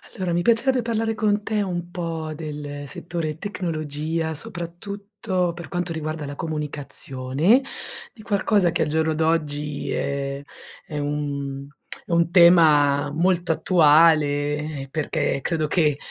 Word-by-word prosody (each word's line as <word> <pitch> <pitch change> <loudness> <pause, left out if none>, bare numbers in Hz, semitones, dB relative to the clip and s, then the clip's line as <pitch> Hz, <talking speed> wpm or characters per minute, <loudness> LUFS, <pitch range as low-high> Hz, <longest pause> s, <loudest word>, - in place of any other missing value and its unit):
Allora, 185 -4 -2
mi 175 - +1
piacerebbe 240 +5 +3
parlare 225 -1 -1
con 210 -1 +1
te 215 -1 0
un 175 -3 -3
po' 165 -3 -4
del 145 -2 -6
settore 160 0 -4
tecnologia, 160 -3 -3
soprattutto 185 +3 -4
per 170 -1 -9
quanto 175 -1 -3
riguarda 155 -1 -4
la 145 0 -6
comunicazione, 150 - 0 0.5
di 225 - -14
qualcosa 200 -3 +2
che - - -1
al - - -2
giorno 160 +1 +1
d'oggi 150 -2 -1
è 140 0 -2 0.5
è 150 - -5
un 140 -1 -3 0.4
è - - -9
un 170 0 +2
tema 150 -5 +6
molto 175 +2 +1
attuale, 160 -2 +5 0.6
eh, 135 - -7
perché 145 -1 -1
credo 160 -3 0
che 150 -2 +2
160 Hz, 130 wpm, -23 LUFS, 150-180 Hz, 0.6 s, tema